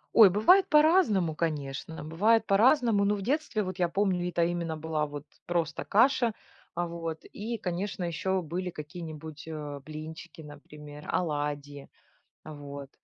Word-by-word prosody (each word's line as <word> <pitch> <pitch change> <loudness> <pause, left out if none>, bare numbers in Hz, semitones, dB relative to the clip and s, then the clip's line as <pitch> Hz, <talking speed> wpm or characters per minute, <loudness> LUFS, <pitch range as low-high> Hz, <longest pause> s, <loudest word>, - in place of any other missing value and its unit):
Ой, 220 -4 +9
бывает 360 - +5
по-разному, 300 - +4
конечно, 155 -1 -3
бывает 210 +9 +2
по-разному. 225 0 +4
Но 205 +1 +2
в 200 - -5
детстве 260 -3 0
вот, 185 0 -6
я 175 -2 +2
помню, 185 -2 0
это 170 -1 +1
именно 170 -2 -2
была 155 -1 -2
вот 145 0 -8 0.2
просто 165 -3 -1
каша, 235 +1 +3 0.4
вот. 170 -2 -4
И, 230 +3 -5
конечно, 185 -1 -3
еще 180 +2 -1
были 180 +3 -3
какие-нибудь, 155 -1 -8
э, 150 -3 -6
блинчики, 155 +2 -9
например, 150 0 -11
оладьи. 145 -3 -3 0.5
Вот. 140 -2 -8
170 Hz, 135 wpm, -29 LUFS, 150-200 Hz, 0.5 s, Ой